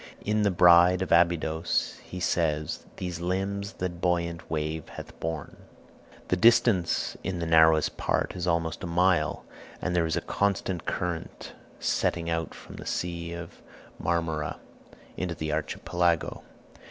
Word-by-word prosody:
In 105 Hz, +1 st, +1 dB
the 105 Hz, -, +3 dB
"Bride 90 Hz, 0 st, +6 dB
of 95 Hz, -, -6 dB
Abydos" 85 Hz, -1 st, +2 dB
he 90 Hz, -, -8 dB
says, 80 Hz, -4 st, -1 dB
"These 90 Hz, -2 st, -4 dB
limbs 100 Hz, +3 st, -2 dB
that 90 Hz, -1 st, -4 dB
buoyant 85 Hz, -1 st, -1 dB
wave 80 Hz, 0 st, -3 dB
hath -, -, -10 dB
borne." 80 Hz, -3 st, -4 dB, 0.7 s
The -, -, +3 dB
distance 115 Hz, -3 st, +3 dB
in 95 Hz, 0 st, -2 dB
the 85 Hz, -, -2 dB
narrowest 80 Hz, -1 st, +4 dB
part -, -, 0 dB
is 90 Hz, 0 st, -3 dB
almost 85 Hz, 0 st, 0 dB
a -, -, -3 dB
mile, 90 Hz, +2 st, +2 dB, 0.3 s
and 90 Hz, -, -2 dB
there 85 Hz, -2 st, +2 dB
is 80 Hz, -, 0 dB
a -, -, 0 dB
constant 100 Hz, -3 st, -1 dB
current 85 Hz, -2 st, -4 dB, 0.3 s
setting 85 Hz, -1 st, 0 dB
out 80 Hz, 0 st, -2 dB
from -, -, -11 dB
the -, -, -8 dB
Sea 85 Hz, -1 st, -3 dB
of 85 Hz, -1 st, -9 dB, 0.4 s
Marmora 80 Hz, -3 st, -1 dB, 0.6 s
into 90 Hz, -2 st, -2 dB
the 80 Hz, -1 st, -3 dB
Archipelago. 85 Hz, +3 st, 0 dB
85 Hz, 140 wpm, -27 LUFS, 80-90 Hz, 0.7 s, Bride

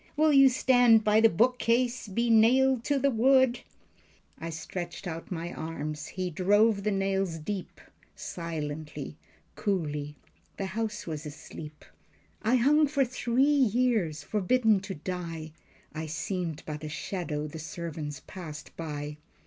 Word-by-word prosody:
Will 310 Hz, 0 st, +4 dB
you 275 Hz, -1 st, +8 dB
stand 245 Hz, -3 st, +5 dB
by 215 Hz, +1 st, +4 dB
the 225 Hz, -, +7 dB
book 245 Hz, +8 st, +2 dB
case, 240 Hz, 0 st, +1 dB
be 235 Hz, +4 st, 0 dB
nailed 250 Hz, +3 st, +5 dB
to 285 Hz, -, +2 dB
the 275 Hz, +1 st, +2 dB
wood?" 260 Hz, +1 st, +4 dB, 0.8 s
I 165 Hz, -, -5 dB
stretched 170 Hz, +3 st, -6 dB
out 165 Hz, 0 st, -6 dB
my 170 Hz, 0 st, -4 dB
arms. 155 Hz, -1 st, -5 dB
He 185 Hz, -1 st, -4 dB
drove 205 Hz, +5 st, +3 dB
the 210 Hz, -, 0 dB
nails 195 Hz, -3 st, 0 dB
deep, 185 Hz, +4 st, -5 dB, 0.4 s
Silently, 150 Hz, -3 st, -5 dB, 0.4 s
coolly. 150 Hz, -7 st, -2 dB, 0.4 s
The 195 Hz, -, -2 dB
house 215 Hz, -1 st, -3 dB
was 155 Hz, -2 st, -5 dB
asleep, 150 Hz, 0 st, -10 dB, 0.6 s
I 225 Hz, +4 st, +2 dB
hung 290 Hz, +5 st, +4 dB
for 280 Hz, -1 st, +2 dB
three 245 Hz, 0 st, 0 dB
years, 240 Hz, -, +2 dB
forbidden 215 Hz, +2 st, +2 dB
to 190 Hz, 0 st, -6 dB
die. 165 Hz, -1 st, -5 dB, 0.4 s
I 160 Hz, 0 st, -4 dB
seemed 165 Hz, 0 st, -3 dB
but 150 Hz, 0 st, -6 dB
a 155 Hz, -, -4 dB
shadow 155 Hz, -2 st, -3 dB
the 155 Hz, +1 st, -7 dB
servants 155 Hz, -3 st, -6 dB
passed 160 Hz, -5 st, -9 dB
by. 150 Hz, -2 st, -5 dB
190 Hz, 140 wpm, -28 LUFS, 160-235 Hz, 0.8 s, you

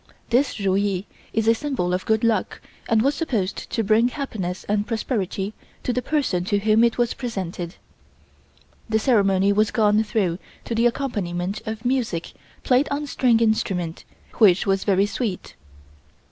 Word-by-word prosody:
This 250 Hz, -1 st, +2 dB
Ru 195 Hz, -2 st, +1 dB
Yee 195 Hz, -1 st, 0 dB, 0.3 s
is 225 Hz, 0 st, 0 dB
a 225 Hz, -, +7 dB
symbol 230 Hz, -9 st, -2 dB
of 185 Hz, -, -2 dB
good 220 Hz, 0 st, +2 dB
luck 225 Hz, -4 st, 0 dB, 0.3 s
and 225 Hz, -1 st, +3 dB
was 280 Hz, +2 st, +3 dB
supposed 230 Hz, -, -2 dB
to 225 Hz, -, -1 dB
bring 220 Hz, +3 st, +4 dB
happiness 220 Hz, -10 st, -4 dB
and 210 Hz, +1 st, -1 dB
prosperity 210 Hz, -3 st, -2 dB, 0.3 s
to 250 Hz, -, 0 dB
the 250 Hz, -, 0 dB
person 250 Hz, -, 0 dB
to 205 Hz, +1 st, +1 dB
whom 215 Hz, +2 st, +3 dB
it 235 Hz, -1 st, +2 dB
was 240 Hz, -1 st, +1 dB
presented. 185 Hz, -7 st, -5 dB, 1.1 s
The 220 Hz, -, +3 dB
ceremony 200 Hz, -4 st, +3 dB
was 210 Hz, +1 st, +2 dB
gone 215 Hz, -1 st, +3 dB
through 195 Hz, -6 st, -1 dB, 0.3 s
to -, -, -3 dB
the 230 Hz, +1 st, +3 dB
accompaniment 200 Hz, -7 st, -3 dB
of 220 Hz, +2 st, -5 dB
music 245 Hz, -10 st, -1 dB, 0.3 s
played 260 Hz, +3 st, +3 dB
on 285 Hz, +1 st, -2 dB
string 250 Hz, -5 st, +2 dB
instruments, 185 Hz, -7 st, 0 dB, 0.4 s
which 195 Hz, -5 st, +5 dB
was 195 Hz, -1 st, +1 dB
very 195 Hz, -1 st, +3 dB
sweet. 205 Hz, -2 st, -4 dB
215 Hz, 160 wpm, -23 LUFS, 195-240 Hz, 1.1 s, a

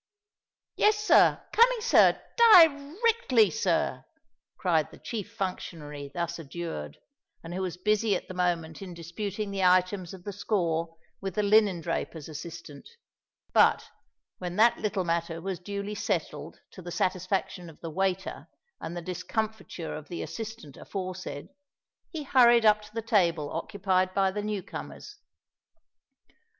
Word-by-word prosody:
"Yes, 420 Hz, 0 st, +4 dB
sir—coming, 465 Hz, +3 st, +4 dB
sir—di 445 Hz, -5 st, +6 dB, 0.4 s
rectly, 310 Hz, -, +4 dB
sir," 460 Hz, -, 0 dB, 0.5 s
cried 165 Hz, -5 st, +1 dB
the -, -, -14 dB
chief 210 Hz, -3 st, -6 dB
functionary 160 Hz, -8 st, -5 dB
thus 170 Hz, +2 st, -3 dB
adjured, 140 Hz, -, -6 dB, 0.5 s
and 165 Hz, +1 st, -7 dB
who 185 Hz, -, -3 dB
was 180 Hz, -2 st, -3 dB
busy 210 Hz, +2 st, +1 dB
at -, -, -5 dB
the -, -, -7 dB
moment 170 Hz, -3 st, -1 dB
in 185 Hz, -3 st, -8 dB
disputing 200 Hz, +5 st, -5 dB
the 195 Hz, -1 st, -2 dB
items 185 Hz, 0 st, +2 dB
of 185 Hz, -2 st, -11 dB
the 205 Hz, -, -6 dB
score 170 Hz, -5 st, -1 dB, 0.2 s
with 195 Hz, -2 st, -4 dB
the 210 Hz, -, +1 dB
linen 205 Hz, -4 st, +4 dB
draper's 165 Hz, -2 st, -4 dB
assistant:—but, 160 Hz, -, -2 dB, 0.5 s
when 180 Hz, -1 st, -5 dB
that 230 Hz, +3 st, +4 dB
little 205 Hz, -3 st, -1 dB
matter 170 Hz, -1 st, -2 dB
was 185 Hz, +1 st, -4 dB
duly 200 Hz, +2 st, -5 dB
settled 210 Hz, -, -3 dB
to 185 Hz, -, -11 dB
the 175 Hz, -, -8 dB
satisfaction 185 Hz, -1 st, -2 dB
of 160 Hz, -, -16 dB
the 165 Hz, -, -6 dB
waiter 190 Hz, +2 st, -2 dB, 0.3 s
and 170 Hz, +2 st, -6 dB
the 175 Hz, -, -5 dB
discomfiture 185 Hz, 0 st, -4 dB
of 150 Hz, -1 st, -9 dB
the 175 Hz, -, -5 dB
assistant 220 Hz, -10 st, -8 dB
aforesaid, 185 Hz, -6 st, -6 dB, 0.6 s
he 315 Hz, -3 st, -5 dB
hurried 240 Hz, -4 st, +5 dB
up 215 Hz, 0 st, +5 dB
to 210 Hz, -, -14 dB
the 225 Hz, -, -2 dB
table 170 Hz, -9 st, +1 dB
occupied 185 Hz, +1 st, -1 dB
by 195 Hz, -1 st, +3 dB
the 210 Hz, +2 st, -3 dB
new 210 Hz, -2 st, -3 dB
comers. -, -, -9 dB
185 Hz, 140 wpm, -28 LUFS, 170-210 Hz, 0.6 s, sir—di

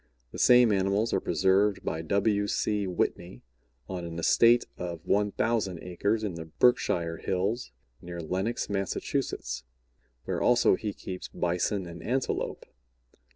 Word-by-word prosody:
The -, -, -8 dB
same 125 Hz, -2 st, +6 dB
animals 100 Hz, +3 st, +1 dB
are -, -, +3 dB
preserved 100 Hz, +1 st, +2 dB
by 80 Hz, -, -2 dB
W. 100 Hz, +4 st, +1 dB
C. 105 Hz, -1 st, 0 dB
Whitney 90 Hz, 0 st, -2 dB, 0.4 s
on 90 Hz, -2 st, -5 dB
an 85 Hz, -1 st, -6 dB
estate 115 Hz, +8 st, +4 dB
of 85 Hz, -2 st, -6 dB
1,000 105 Hz, -1 st, 0 dB
acres 100 Hz, +5 st, -1 dB
in 100 Hz, -4 st, -2 dB
the 80 Hz, -1 st, -7 dB
Berkshire 85 Hz, -4 st, +1 dB
Hills, 95 Hz, -, -2 dB, 0.3 s
near 85 Hz, 0 st, -7 dB
Lenox, 95 Hz, +8 st, -2 dB
Mass., 100 Hz, -2 st, -2 dB, 1.3 s
where -, -, -2 dB
also 120 Hz, 0 st, +4 dB
he 105 Hz, +2 st, -2 dB
keeps 95 Hz, -2 st, -7 dB
Bison 90 Hz, +3 st, -1 dB
and 85 Hz, 0 st, -9 dB
Antelope. 130 Hz, +2 st, -2 dB
95 Hz, 130 wpm, -28 LUFS, 90-110 Hz, 1.3 s, same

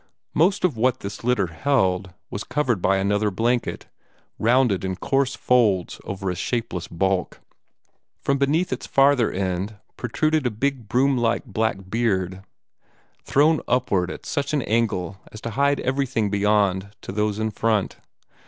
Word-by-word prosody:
Most 185 Hz, +5 st, +2 dB
of 165 Hz, -8 st, +1 dB
what 125 Hz, +3 st, +1 dB
this 100 Hz, +1 st, -7 dB
litter 120 Hz, -5 st, +2 dB
held 95 Hz, 0 st, 0 dB, 0.2 s
was 100 Hz, -, -4 dB
covered 125 Hz, -10 st, 0 dB
by 95 Hz, +2 st, +3 dB
another 105 Hz, +2 st, +1 dB
blanket, 120 Hz, +5 st, -1 dB, 0.5 s
rounded 120 Hz, -4 st, +3 dB
in 95 Hz, -1 st, -2 dB
coarse 135 Hz, +5 st, 0 dB
folds 105 Hz, -8 st, +2 dB
over 95 Hz, -1 st, -3 dB
a -, -, -4 dB
shapeless 90 Hz, -2 st, -3 dB
bulk. 95 Hz, +1 st, -1 dB, 0.8 s
From 140 Hz, 0 st, 0 dB
beneath 150 Hz, +4 st, +1 dB
its 130 Hz, -, -6 dB
farther 135 Hz, -4 st, +4 dB
end 95 Hz, +2 st, -2 dB, 0.2 s
protruded 155 Hz, +4 st, 0 dB
a -, -, +1 dB
big 120 Hz, 0 st, -2 dB
broom 130 Hz, +1 st, +2 dB
like 120 Hz, +2 st, +1 dB
black 105 Hz, -3 st, -2 dB
beard, 95 Hz, -4 st, -1 dB, 0.8 s
thrown 150 Hz, +2 st, +3 dB
upward 100 Hz, -8 st, +1 dB
at -, -, -8 dB
such 140 Hz, +1 st, -2 dB
an 145 Hz, -4 st, +1 dB
angle 100 Hz, -4 st, -1 dB
as 110 Hz, -, -9 dB
to 115 Hz, -, -4 dB
hide 140 Hz, +4 st, +2 dB
everything 130 Hz, -6 st, 0 dB
beyond 100 Hz, -1 st, +1 dB
to -, -, -7 dB
those 105 Hz, +1 st, 0 dB
in 110 Hz, 0 st, -1 dB
front. 110 Hz, -2 st, 0 dB
110 Hz, 150 wpm, -23 LUFS, 95-130 Hz, 0.8 s, farther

